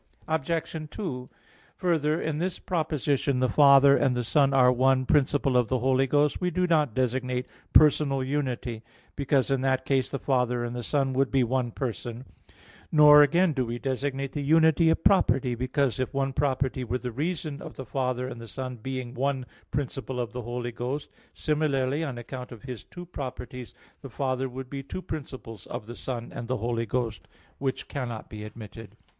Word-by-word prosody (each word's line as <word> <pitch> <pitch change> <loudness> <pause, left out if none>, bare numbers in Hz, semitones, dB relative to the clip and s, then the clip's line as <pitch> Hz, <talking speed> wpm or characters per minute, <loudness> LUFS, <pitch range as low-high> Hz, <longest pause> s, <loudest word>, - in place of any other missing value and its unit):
Obj. 160 0 -2
2: 130 -12 -5 0.5
Further, 160 -3 +1
in 155 -2 -2
this 180 +1 -1
proposition 150 -5 0
"the 130 - +3
Father 140 +2 +7
and 130 -3 +2
the 120 - 0
Son 140 +3 +3
are 130 -2 +5
one 130 +1 +3
principle 140 -1 +2
of 125 -2 +4
the 130 - +1
Holy 130 +2 +2
Ghost," 145 +4 +2
we 180 - +1
do 180 +1 +1
not 150 -8 +2
designate 125 0 -1 0.2
personal 145 -3 +5
unity, 130 -4 -2 0.3
because 140 -1 +1
in 135 -1 +2
that 130 -1 +1
case 135 -2 +1
the 140 - -3
Father 125 -3 0
and 120 0 -4
the 120 - -3
Son 135 +2 0
would 135 +1 +2
be 135 -2 +3
one 125 0 0
person; 120 0 -5 0.7
nor 150 -1 +8
again 170 +4 +4
do 130 -2 0
we 120 0 -3
designate 135 +1 -2
the 145 - -3
unity 160 +2 +4
of 160 - +1
property, 130 - +3
because 130 +1 0
if 130 - -1
one 135 -1 0
property 135 -2 0
were 125 +1 -1
the 125 -1 -5
reason 155 +2 -3
of - - -9
the 130 - -7
Father 125 +1 -1
and 120 -2 -7
the 115 - -9
Son 130 0 -5
being 130 +1 -5
one 135 0 -1 0.2
principle 130 -2 -3
of 120 -2 -2
the 125 0 -5
Holy 120 +1 -4
Ghost, 125 +5 -4 0.3
similarly, 150 -1 0
on 135 -6 -4
account 125 +2 -7
of 115 -4 -11
His 125 -5 -7
two 175 0 -10
properties, 125 -5 -7 0.3
the 135 - -8
Father 130 +1 -1
would 130 +1 -7
be 140 +1 -5
two 185 +7 -7
principles 130 - -7
of - - -6
the 120 +2 -8
Son 120 -2 -5
and - - -7
of 120 - -5
the 130 +1 -1
Holy 115 +1 -2
Ghost, 115 -1 -2 0.3
which 135 -1 -2
cannot 120 -5 -5
be 105 -1 -7
admitted. 110 0 -10
130 Hz, 185 wpm, -27 LUFS, 125-145 Hz, 0.7 s, nor